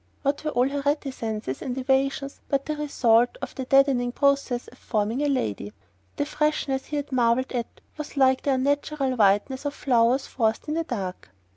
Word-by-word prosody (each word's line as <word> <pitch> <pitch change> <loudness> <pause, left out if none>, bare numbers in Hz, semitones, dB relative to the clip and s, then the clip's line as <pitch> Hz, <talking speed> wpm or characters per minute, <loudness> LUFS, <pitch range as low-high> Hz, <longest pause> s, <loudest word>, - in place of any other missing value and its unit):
What 280 +1 0
were 305 - -1
all 250 -3 +2
her 280 +1 -2
reticences 235 - -2
and 255 0 -4
evasions 275 +1 0
but 275 -1 0
the 305 - -2
result 245 - +2
of - - -6
the 265 - -5
deadening 270 -2 +3
process 275 -3 +1
of - - -16
forming 220 +3 -1
a 295 - +1
"lady"? 105 - -2 0.4
The 290 - -1
freshness 300 -3 -1
he 300 - -5
had 290 -1 -3
marvelled 245 0 +2
at 240 -2 -2 0.3
was 300 -1 -7
like 260 -1 +4
the 280 - +1
unnatural 280 0 0
whiteness 215 +5 +2
of 285 0 -3
flowers 250 0 +2
forced 225 0 -1
in 300 - -1
the 330 +1 -1
dark. 190 - -5
265 Hz, 180 wpm, -25 LUFS, 240-285 Hz, 0.4 s, like